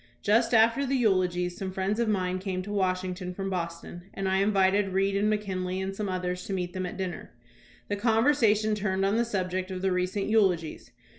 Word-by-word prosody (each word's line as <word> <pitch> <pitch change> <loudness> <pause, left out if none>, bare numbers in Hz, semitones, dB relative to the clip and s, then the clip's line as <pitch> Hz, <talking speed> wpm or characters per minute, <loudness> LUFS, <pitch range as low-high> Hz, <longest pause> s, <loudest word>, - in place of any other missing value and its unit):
Just 225 +3 +3
after 230 +5 +4
the 275 0 0
eulogies, 180 -6 +1
some 190 0 -5
friends 190 +3 -1
of 235 -2 +1
mine 185 -3 0
came 185 -1 -3
to 205 - -7
Wash 185 -2 +1
ington 180 0 -5
from 195 0 -3
Boston, 175 0 -5
and 195 0 -2
I 190 0 +2
invited 195 -1 +2
Reed 195 +1 +1
and 210 +2 +2
McEonley 185 -3 -2
and 190 0 -3
some 205 -1 -3
others 180 -1 -3
to 195 - -4
meet 180 -2 -3
them 185 -1 -3
at 180 - -7
dinner. 185 -2 -5 0.6
The 205 - -2
con 225 +1 +2
versation 215 -6 +3
turned 195 -2 0
on 200 +3 +1
the 235 - +3
subject 185 -3 -2
of 185 0 -5
the 190 - +2
recent 185 +2 -1
eulogies. 190 -7 +1
190 Hz, 210 wpm, -28 LUFS, 185-210 Hz, 0.6 s, after